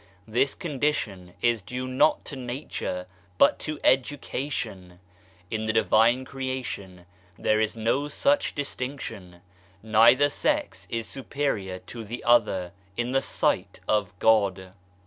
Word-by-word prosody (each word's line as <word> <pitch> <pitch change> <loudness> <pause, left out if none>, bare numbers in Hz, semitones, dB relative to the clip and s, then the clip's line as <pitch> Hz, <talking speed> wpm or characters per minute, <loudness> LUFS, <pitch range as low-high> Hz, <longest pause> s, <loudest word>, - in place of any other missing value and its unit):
This 125 +5 +1
condition 135 - -2
is 120 -2 +3
due 125 +8 -5
not 130 +4 +3
to 145 - -6
Nature, 120 -8 -4 0.3
but 140 - +5
to 155 -1 -4
education. 125 -9 -1 0.5
In 110 0 -2
the 110 - +1
Divine 110 +4 +4
Creation 130 -10 -5 0.3
there 110 0 +2
is 110 0 0
no 115 +6 0
such 280 - +1
distinction. 125 -10 -5 0.4
Neither 115 +6 +6
sex 300 - -1
is 115 -1 -2
superior 130 -9 -2
to 115 -1 -7
the 115 +3 -7
other 105 -7 +3 0.3
in 120 +1 -1
the 135 0 +2
sight - - 0
of 100 -4 0
God. 95 -4 +2
120 Hz, 125 wpm, -26 LUFS, 100-135 Hz, 0.5 s, Neither